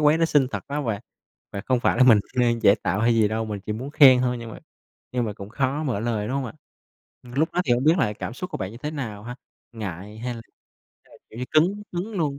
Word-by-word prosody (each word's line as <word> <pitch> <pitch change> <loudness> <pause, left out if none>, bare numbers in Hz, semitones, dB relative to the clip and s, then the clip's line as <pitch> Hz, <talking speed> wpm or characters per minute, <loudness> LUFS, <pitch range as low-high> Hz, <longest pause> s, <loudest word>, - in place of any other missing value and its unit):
quán 150 +1 +4
đó 165 - +3
xinh 145 -5 +3
thật, - - -4
phải 145 - -3
hông 145 - -3
bạn? 105 -3 -1 0.5
Và 100 - -4
không 125 -2 +2
phải - - +2
là - - +7
mình 115 -5 +7 0.2
đang 120 -2 +2
giả 100 - +7
tạo 95 +5 0
hay 115 +1 +3
gì 110 -2 +3
đâu, 110 +1 -2
mình 105 -2 -5
chỉ 105 - -4
muốn 125 +6 -5
khen 135 -4 +7
thôi 125 -1 0
nhưng 115 -1 -8
mà - - -9 0.5
nhưng 125 -1 0
mà 105 - -3
cũng 100 -1 -9
khó 135 +5 -1
mở 125 -8 -1
lời, 110 -2 -1
đúng 135 - -1
không 140 - -2
ạ? - - -7 0.7
Lúc 135 +6 -1
đó 180 - +1
thì 125 - +2
hổng 120 +2 +1
biết 160 +2 +6
là 105 -9 +1
cảm 115 - -6
xúc 180 +7 -6
của - - -4
bạn 95 -1 -4
như 115 - -10
thế 150 - -4
nào 115 -9 -5
ha, 125 +1 -7 0.4
ngại 105 -1 -7
hay 120 +2 -4
là 115 - -8 0.6
hay - - -20
là, - - -17
kiểu 110 - -11
như, 125 - -2
cứng 180 +7 +3
cứng 180 +5 -4
luôn? 150 -8 -1
125 Hz, 280 wpm, -24 LUFS, 110-145 Hz, 0.7 s, là